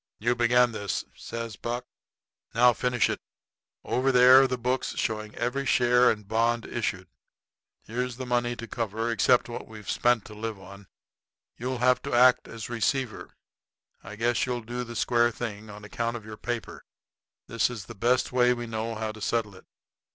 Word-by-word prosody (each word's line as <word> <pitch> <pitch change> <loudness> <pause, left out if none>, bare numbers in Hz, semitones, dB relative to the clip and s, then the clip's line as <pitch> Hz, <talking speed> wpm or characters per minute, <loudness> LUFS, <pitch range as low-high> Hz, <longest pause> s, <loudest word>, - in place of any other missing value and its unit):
"You 120 +3 +1
begun 120 0 +3
this," 100 -3 -3
says 115 -2 -6
Buck; 120 +1 -4 0.7
"now 120 +1 +6
finish 125 -1 +1
it. - - -3 0.6
Over 130 +2 +1
there 125 +1 +8
are 135 - +4
the 125 - -2
books, 125 +2 -1
showing 110 -2 -3
every 130 +3 -1
share 125 -1 +4
and 105 -2 -2
bond 115 +1 +1
issued. - - -3 0.8
Here's 125 +2 -3
the 130 - -5
money 120 -1 0
to 120 0 -8
cover, 115 0 -2
except 120 +3 +3
what 120 - -7
we've 105 -2 -7
spent 120 -3 +2
to 105 - -11
live 110 -1 -5
on. 100 +1 -13 0.7
You'll 125 +2 -3
have 125 0 +4
to - - -3
act 125 +1 +5
as 115 -1 -7
receiver. 120 +1 -2 0.7
I 105 +2 -9
guess 120 +3 +1
you'll 125 -1 -2
do 120 +2 -4
the 120 -1 -8
square 120 +1 +3
thing 110 -2 -6
on 105 0 -10
account 115 +4 -3
of 110 - -12
your 110 0 -8
paper. 120 +1 -5 0.6
This 115 +1 +1
is 115 -5 -7
the 115 - -9
best 120 +4 +1
way 125 0 +3
we 120 0 -5
know 115 0 -4
how 110 0 -3
to 110 0 -12
settle 110 -1 -1
it. 95 - -17
120 Hz, 180 wpm, -27 LUFS, 110-125 Hz, 0.8 s, there